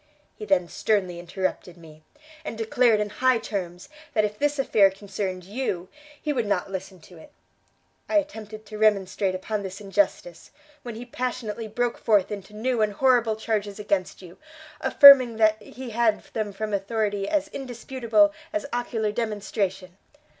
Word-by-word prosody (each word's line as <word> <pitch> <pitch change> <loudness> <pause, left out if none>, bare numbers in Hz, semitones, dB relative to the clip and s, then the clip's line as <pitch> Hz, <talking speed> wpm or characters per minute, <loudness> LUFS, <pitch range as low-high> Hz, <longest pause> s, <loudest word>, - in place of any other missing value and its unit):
He 215 - -8
then 190 -3 +2
sternly 185 -3 -1
interrupted 180 0 -4
me, 155 -2 -15 0.4
and 230 - -6
declared 225 0 +3
in 210 -1 -2
high 255 +1 +3
terms, 180 -4 -5 0.3
that 215 -1 +4
if 210 0 -5
this 290 0 +1
affair 215 -7 +4
concerned 195 -1 -5
you, 190 -3 -4 0.3
he 300 - -2
would 240 -6 -1
not 195 -1 -1
listen 190 0 -6
to 175 +1 -16
it. - - -15 0.8
I - - -1
attempted 220 -8 -4
to 215 0 -9
remonstrate 195 -2 +2
upon 210 +3 -3
this 190 -1 -7
injustice, 305 - -1 0.3
when 240 -2 -7
he 235 +2 -8
passionately 235 -3 -4
broke 240 +2 -2
forth 210 -4 +2
into 205 0 -7
new 240 +1 -1
and 210 -1 +1
horrible 240 -2 +3
charges 210 -2 -2
against 200 -3 -2
you, 175 0 -13 0.4
affirming 260 -5 +8
that 215 -1 +3
he 255 -2 -9
had 225 -1 +1
them 215 -2 -2
from 210 +2 -4
authority 205 0 -1
as 300 -1 0
indisputable 265 +2 0 0.2
as 315 -1 -2
ocular 225 -3 -1
demonstration. 200 -4 -3
215 Hz, 155 wpm, -25 LUFS, 195-240 Hz, 0.8 s, affirming